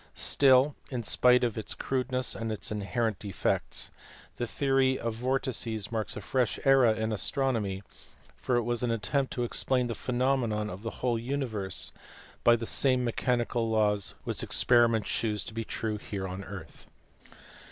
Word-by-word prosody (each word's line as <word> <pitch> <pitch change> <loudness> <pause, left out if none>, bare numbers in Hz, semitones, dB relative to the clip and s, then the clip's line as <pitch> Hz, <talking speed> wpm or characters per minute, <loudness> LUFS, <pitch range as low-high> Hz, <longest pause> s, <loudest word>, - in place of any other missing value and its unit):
Still, 135 +1 +4
in 125 -3 -3
spite 125 +3 +4
of 115 -2 0
its 110 - -4
crudeness 130 -1 -1
and 115 -1 -4
its 110 - -4
inherent 105 0 -1
defects, 95 - -1 0.5
the 120 - -2
theory 135 +1 +2
of 115 -1 -3
vortices 120 -3 -1
marks 110 -2 -3
a - - -5
fresh 125 -4 0
era 130 -5 +5
in 110 0 -2
astronomy, 110 -3 0 0.5
for 125 - -1
it 120 - +2
was 120 0 -1
an 125 - 0
attempt 115 +5 0
to 125 - -1
explain 125 +1 0
the 120 - -2
phenomena 120 -4 0
of 95 - -9
the 115 - -3 0.2
whole 120 -2 +1
universe 115 -6 -3 0.5
by 120 - +7
the 115 0 -4
same 130 +1 +2
mechanical 120 -1 0
laws 105 -2 +1
which - - -2
ex - - 0
periment 115 -3 +4
shews 105 -1 -1
to - - -9
be 115 0 -3
true 110 -1 -3 0.3
on 95 +1 -6
the - - -10
earth. 95 -4 -10
115 Hz, 165 wpm, -29 LUFS, 110-125 Hz, 0.5 s, by